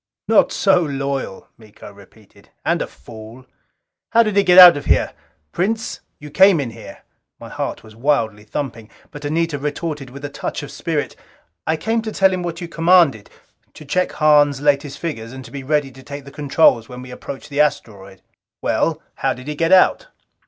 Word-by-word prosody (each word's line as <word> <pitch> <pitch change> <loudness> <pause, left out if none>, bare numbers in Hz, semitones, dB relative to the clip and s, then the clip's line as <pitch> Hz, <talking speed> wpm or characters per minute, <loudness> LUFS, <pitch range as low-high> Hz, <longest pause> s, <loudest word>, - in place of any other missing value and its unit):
"Not - - +4
so 195 -3 +3
loyal," 140 - -4
Miko 105 -2 -14
repeated. 100 +1 -20 0.2
"And - - +1
a - - -2
fool!" 110 - -13 0.7
"How 230 0 +6
did 215 -3 -2
he 200 - +5
get 180 -2 +4
out 180 -2 +11
of 145 - -6
here? - - +1 0.4
Prince, 220 +5 -2 0.2
you 150 0 -12
came 190 +1 +5
in 130 -5 -3
here!" - - -12 0.4
My - - -10
heart - - -5
was 110 -1 -15
wildly 115 -5 0
thumping. 115 0 -6 0.2
But 145 0 -9
Anita 160 0 -1
retorted 150 -1 -4
with 140 +3 -9
a - - -2
touch - - -5
of - - -9
spirit, - - -3 0.5
"I 160 - +1
came 225 +7 -1
to 220 -1 -5
tell 190 -2 +3
him 185 - -2
what 170 -1 -5
you 170 - -5
commanded. 165 - +3 0.5
To 155 - -12
check 180 +6 -1
Hahn's 145 -3 +3
latest 145 -1 0
figures 120 -8 -6
and 130 -1 -9
to - - -13
be 140 - -6
ready 145 0 -1
to 130 +1 -15
take 140 +1 -9
the 140 - -11
controls 140 -5 +2
when 125 0 -9
we 130 - -11
approached 135 +3 -9
the 145 +1 +2
asteroid." 105 -10 -3 0.4
"Well, - - -1
how - - -1
did 125 +3 -12
he 150 - -3
get 165 +3 -1
out?" 190 - +4
145 Hz, 190 wpm, -19 LUFS, 125-165 Hz, 0.7 s, out